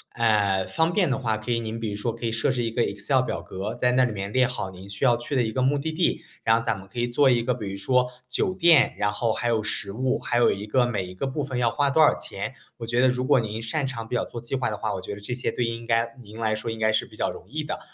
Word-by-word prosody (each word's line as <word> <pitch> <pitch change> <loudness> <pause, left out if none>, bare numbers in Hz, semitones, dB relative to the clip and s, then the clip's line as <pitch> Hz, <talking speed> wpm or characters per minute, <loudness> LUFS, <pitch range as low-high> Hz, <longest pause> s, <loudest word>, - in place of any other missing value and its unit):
哎， 100 -4 +2
方 160 - +1
便 180 -9 +2
的 135 - +1
话， 110 -4 0
可 110 +3 -5
以 115 - +2
您 110 0 -4
比 115 -1 -3
如 100 - -4
说 110 +2 -2
可 115 - -6
以 115 - 0
设 115 +4 +1
置 125 -2 0
一 115 - -1
个 115 +1 +1
Excel 100 +7 +1
表 125 - -3
格， 100 +4 -5
在 125 0 +2
那 130 0 +4
里 120 - -2
面 100 0 -4
列 130 +1 +3
好 125 -6 -4
您 95 +1 -11
需 100 - -5
要 120 -3 +5
去 130 +4 -4
的 125 - +3
一 110 - -2
个 130 - -1
目 135 +3 +3
的 160 +3 -2
地。 170 +2 0 0.2
然 115 0 +5
后 115 - -3
咱 110 -4 0
们 95 - -13
可 120 +5 -7
以 120 - +1
做 135 +3 +4
一 120 -2 +3
个 125 - +1
比 110 -5 -5
如 95 - -5
说， 125 +6 +2 0.2
酒 185 - 0
店， 170 -6 +5
然 105 0 +1
后 110 +2 0
还 120 +2 -1
有 110 -2 +2
食 105 -2 -2
物， 130 +4 0
还 120 - -1
有 120 - +4
一 100 +1 -6
个 125 +4 +2
每 100 -5 -1
一 90 - -9
个 95 +9 -3
部 140 +2 -2
分 130 -3 -2
要 120 -1 +3
花 145 +3 +1
多 155 +3 +3
少 155 - +5
钱， - - -5 0.2
我 115 - -6
觉 120 +1 +1
得 130 - +5
如 125 0 -1
果 135 -3 +4
您 110 +1 -4
擅 135 +5 -1
长 115 -4 -5
比 125 - -3
较 120 - +1
做 120 - -7
计 120 +3 -4
划 130 - 0
的 105 - -4
话， - - -2
我 95 - -4
觉 100 - -6
得 - - -10
这 105 +4 -4
些 125 - -2
对 120 - -1
应 115 0 -4
该 115 0 +1
您 110 +2 -11
来 110 -1 +1
说 110 +2 -4
应 115 - -6
该 110 0 +2
是 110 - +1
比 - - -16
较 - - 0
容 - - -10
易 - - -3
的。 - - -4
115 Hz, 360 characters per minute, -25 LUFS, 110-130 Hz, 0.2 s, 要